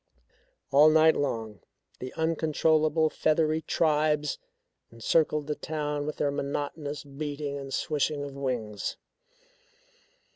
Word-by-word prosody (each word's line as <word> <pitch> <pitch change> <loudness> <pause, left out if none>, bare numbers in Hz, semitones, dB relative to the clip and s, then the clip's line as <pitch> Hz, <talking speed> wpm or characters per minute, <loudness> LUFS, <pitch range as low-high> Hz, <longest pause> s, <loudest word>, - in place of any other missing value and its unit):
All 145 +3 +7
night 160 +1 +5
long 115 -7 -2 0.4
the 130 0 -6
uncontrollable 160 -1 +2
feathery 155 0 +1
tribes 150 -2 +1 0.5
encircled 150 +6 +1
the 150 - -1
town 150 -1 -3
with 150 - -4
their 145 - +1
monotonous 145 +1 -3
beating 145 0 -5
and 135 -1 -8
swishing 145 +1 -1
of 140 -1 -6
wings. 120 -7 -3
150 Hz, 105 wpm, -28 LUFS, 140-155 Hz, 0.5 s, All